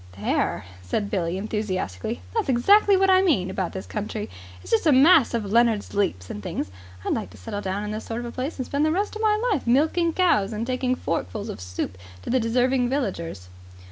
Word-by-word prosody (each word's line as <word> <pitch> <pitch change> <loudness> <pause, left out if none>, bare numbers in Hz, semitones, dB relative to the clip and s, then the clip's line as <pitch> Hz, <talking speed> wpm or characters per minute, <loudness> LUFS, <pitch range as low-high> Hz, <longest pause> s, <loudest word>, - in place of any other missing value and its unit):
"There," - - 0 0.2
said 200 - -2
Billie 175 -2 -1
enthusiastically, 190 - -3
"that's - - -1
exactly 395 - +5
what 385 0 +4
I 375 0 +6
mean 235 - +2
about 190 -2 -2
this 190 - -6
country. 210 0 -5 0.3
It's - - -10
just 225 +8 +3
a - - +6
mass 275 -1 +6
of 225 -3 -1
Leonard's 230 -2 +2
Leaps 95 - -1
and 105 - -6
things. 100 -1 -4 0.3
I'd - - +1
like - - -3
to 105 - -15
settle 155 - -5
down 195 +1 -3
in 210 - -4
this 215 +1 -5
sort 235 +1 -4
of 235 - -6
place 265 +5 -4
and 260 - -3
spend 285 +3 -1
the 310 - +3
rest 405 +6 -1
of 430 - -5
my 425 -1 +3
life 275 - -3
milking 315 +7 +3
cows 235 - +2
and 215 +2 -3
taking 255 0 0
forkfuls 165 - -3
of - - -7
soup 90 0 -5 0.2
to - - -4
the 260 - +3
deserving 245 +2 +1
villagers." 170 - -3
230 Hz, 210 wpm, -24 LUFS, 190-280 Hz, 0.3 s, I